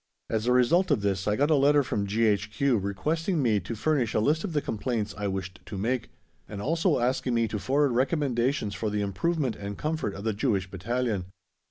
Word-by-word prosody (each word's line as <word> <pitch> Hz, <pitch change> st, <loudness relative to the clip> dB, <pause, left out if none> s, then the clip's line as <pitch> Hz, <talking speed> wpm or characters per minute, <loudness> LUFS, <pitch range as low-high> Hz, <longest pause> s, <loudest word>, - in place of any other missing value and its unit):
As 110 Hz, +1 st, 0 dB
a -, -, +4 dB
result 160 Hz, +10 st, +4 dB
of 140 Hz, -8 st, +2 dB
this 95 Hz, -1 st, 0 dB
I 105 Hz, -, +2 dB
got 145 Hz, +6 st, +2 dB
a -, -, +6 dB
letter 145 Hz, +1 st, +4 dB
from 105 Hz, -6 st, -2 dB
G.H.Q. 110 Hz, +3 st, +1 dB
requesting 155 Hz, -, -1 dB
me 115 Hz, -6 st, +2 dB
to 100 Hz, +5 st, -6 dB
furnish 125 Hz, -2 st, 0 dB
a -, -, +4 dB
list 150 Hz, +9 st, +2 dB
of 185 Hz, -, -4 dB
the 150 Hz, -, +2 dB
complaints 115 Hz, -4 st, -2 dB
I 105 Hz, -1 st, -3 dB
wished 95 Hz, -1 st, -4 dB
to 100 Hz, -, -6 dB
make, 120 Hz, +3 st, -1 dB, 0.4 s
and 100 Hz, -1 st, -6 dB
also 165 Hz, -, +1 dB
asking 125 Hz, 0 st, 0 dB
me 115 Hz, -1 st, +2 dB
to 105 Hz, -, -3 dB
forward 140 Hz, +4 st, +2 dB
recommendations 130 Hz, -3 st, 0 dB
for 110 Hz, -, -2 dB
the 105 Hz, 0 st, -1 dB
improvement 125 Hz, -, -1 dB
and 100 Hz, 0 st, -6 dB
comfort 155 Hz, -9 st, -2 dB
of 100 Hz, -, -7 dB
the 110 Hz, -1 st, 0 dB
Jewish 100 Hz, -3 st, -1 dB
Battalion. 105 Hz, 0 st, -2 dB
115 Hz, 205 wpm, -27 LUFS, 100-145 Hz, 0.4 s, a